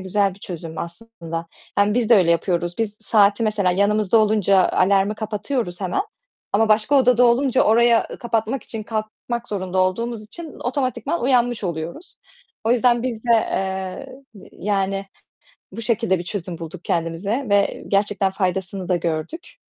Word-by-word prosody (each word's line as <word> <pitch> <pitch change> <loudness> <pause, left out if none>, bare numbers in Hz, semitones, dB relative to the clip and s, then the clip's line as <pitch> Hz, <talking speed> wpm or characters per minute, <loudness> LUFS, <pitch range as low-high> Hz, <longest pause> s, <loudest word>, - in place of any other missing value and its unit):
güzel 195 0 0
bir - - -19
çözüm 165 -2 -7
aslında. 170 -3 -6 0.3
Yani 205 +1 +3
biz 240 -2 +1
de 235 - +7
öyle 180 -4 +4
yapıyoruz. 175 0 0
Biz, 215 -2 -2
saati 210 +1 +3
mesela 210 -4 +1
yanımızda 205 +3 +2
olunca 205 -3 +3
alarmı 195 +2 +2
kapatıyoruz 215 -2 -3
hemen 185 - 0 0.5
ama 220 +2 +3
başka 215 +6 +3
odada 250 -2 +5
olunca 255 +2 +3
oraya 230 +1 +4
kapatmak 230 +1 -1
için, 220 -2 -7
kalkmak 225 +2 -4
zorunda 185 -2 -3
olduğumuz 220 +5 0
için 320 +8 -9
otomatikman 255 +3 -2
uyanmış 245 -3 +2
oluyoruz. 170 - -5 0.5
O 225 - +3
yüzden 240 -1 +3
biz 240 -3 -4
de, 240 - -1
eee, 195 +7 -2 0.3
yani 195 -1 -1 0.7
bu 230 - -7
şekilde 225 -5 +1
bir 175 - -5
çözüm 180 -2 -5
bulduk 165 +2 -8
kendimize 175 +10 -1
ve 200 0 +1
gerçekten 200 -1 +1
faydasını 190 0 -2
da 180 - +3
gördük. 175 - -4
210 Hz, 145 wpm, -21 LUFS, 185-235 Hz, 0.7 s, de